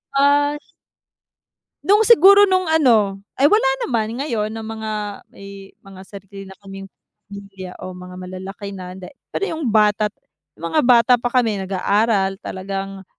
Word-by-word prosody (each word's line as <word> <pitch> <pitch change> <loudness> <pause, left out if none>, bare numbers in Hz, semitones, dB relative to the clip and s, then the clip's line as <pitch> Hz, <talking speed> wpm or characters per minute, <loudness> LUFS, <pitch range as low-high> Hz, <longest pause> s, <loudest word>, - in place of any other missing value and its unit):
Ah 290 +1 +3 1.3
Nung 410 +2 +4
siguro 405 -2 +6
nung 370 -1 +1
ano, 225 -11 +2 0.2
ay 275 - +3
wala 315 -2 +4 0.2
naman 230 -1 -2
ngayon 230 -7 -2
na 220 0 -7
mga 220 0 -6 0.5
eh 195 0 -11
may 195 - -18
mga 190 - -12
sarili 195 0 -11
na 190 - -14
kaming 195 -1 -11 0.4
pamilya 195 -2 -10
o 185 - -7
mga 180 0 -11
malalaki 190 +2 -8
na 185 -1 -9
da 185 - -10 0.2
pero - - -4
'yung 320 -5 -4
bata 210 0 +2 0.5
mga 165 0 -1
bata 240 -1 +4
pa 245 - -1
kami 230 -5 0
nag-aaral 195 +1 0
talagang 195 0 -6
210 Hz, 145 wpm, -20 LUFS, 195-255 Hz, 1.3 s, siguro